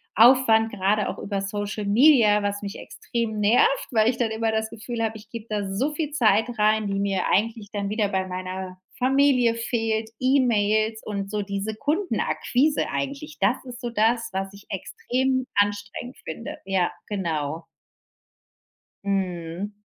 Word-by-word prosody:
Aufwand, 225 Hz, -1 st, +6 dB
gerade 205 Hz, +1 st, +1 dB
auch -, -, -5 dB
über 200 Hz, -1 st, -3 dB
Social 205 Hz, +1 st, -3 dB
Media, 215 Hz, -2 st, +5 dB
was 205 Hz, 0 st, -2 dB
mich 200 Hz, -1 st, -6 dB
extrem 225 Hz, -3 st, -4 dB
nervt, 455 Hz, -, +3 dB
weil 220 Hz, -2 st, +4 dB
ich 250 Hz, -, 0 dB
dann 235 Hz, -3 st, 0 dB
immer 220 Hz, 0 st, 0 dB
das 220 Hz, 0 st, -1 dB
Gefühl 230 Hz, +1 st, -5 dB
habe, 220 Hz, 0 st, -2 dB
ich 215 Hz, -, -15 dB
gebe 230 Hz, -1 st, -8 dB
da 205 Hz, -2 st, -2 dB
so 265 Hz, +10 st, 0 dB
viel 300 Hz, -1 st, -3 dB
Zeit 225 Hz, -7 st, +3 dB
rein, 215 Hz, 0 st, +3 dB
die 195 Hz, 0 st, -1 dB
mir 195 Hz, -2 st, 0 dB
eigentlich 220 Hz, 0 st, 0 dB
dann 200 Hz, -1 st, -2 dB
wieder 210 Hz, 0 st, +1 dB
bei 190 Hz, -1 st, -1 dB
meiner 185 Hz, 0 st, -5 dB, 0.2 s
Familie 255 Hz, -2 st, +3 dB
fehlt, 225 Hz, -1 st, -1 dB
E-Mails 220 Hz, -4 st, +2 dB
und 200 Hz, -2 st, -4 dB
so 210 Hz, -1 st, -1 dB
diese 200 Hz, +2 st, -3 dB
Kundenakquise 295 Hz, -, 0 dB
eigentlich. 285 Hz, +3 st, -4 dB
Das 200 Hz, +6 st, +3 dB
ist 250 Hz, 0 st, -9 dB
so 240 Hz, -, -3 dB
das, 230 Hz, +1 st, +1 dB
was 195 Hz, +1 st, -3 dB
ich 200 Hz, +1 st, -14 dB
extrem 260 Hz, +6 st, -1 dB
anstrengend 205 Hz, +4 st, -1 dB
finde. 160 Hz, +9 st, -6 dB
Ja, 190 Hz, -2 st, +1 dB, 0.2 s
genau. 165 Hz, -6 st, -2 dB, 1.4 s
Mhm. 185 Hz, -1 st, -2 dB
215 Hz, 155 wpm, -24 LUFS, 200-240 Hz, 1.4 s, Aufwand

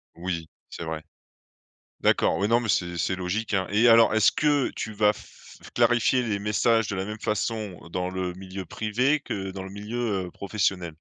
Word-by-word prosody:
Oui! 85 Hz, -2 st, -4 dB, 0.2 s
c'est -, -, -7 dB
vrai. 80 Hz, -1 st, -4 dB, 1.0 s
D'accord! -, -, +3 dB
Oui, 100 Hz, -, +1 dB
non 115 Hz, +1 st, +4 dB
mais 115 Hz, -, -4 dB
c'est 85 Hz, -2 st, 0 dB
c'est 95 Hz, +3 st, 0 dB
logique, 95 Hz, +4 st, -2 dB
hein! 95 Hz, -2 st, +1 dB
Et 110 Hz, +4 st, +4 dB
alors, 115 Hz, -1 st, +6 dB
est-ce 110 Hz, -2 st, +5 dB
que 145 Hz, -3 st, +2 dB
tu 110 Hz, -, -4 dB
vas 105 Hz, 0 st, +3 dB
f -, -, -15 dB, 0.2 s
clarifier 120 Hz, +2 st, +3 dB
les 110 Hz, -4 st, -1 dB
messages 105 Hz, +2 st, +2 dB
de -, -, -2 dB
la 95 Hz, -, -2 dB
même 105 Hz, +2 st, -6 dB
façon 105 Hz, -2 st, -2 dB, 0.2 s
dans 90 Hz, 0 st, -1 dB
le 95 Hz, -1 st, -3 dB
milieu 95 Hz, 0 st, -7 dB
privé 120 Hz, -, 0 dB
que 95 Hz, -7 st, -4 dB
dans 95 Hz, 0 st, -7 dB
le 95 Hz, -, -8 dB
milieu, 105 Hz, -2 st, -3 dB
heu, -, -, -9 dB
professionnel? 95 Hz, -3 st, -1 dB
100 Hz, 190 wpm, -26 LUFS, 95-115 Hz, 1.0 s, alors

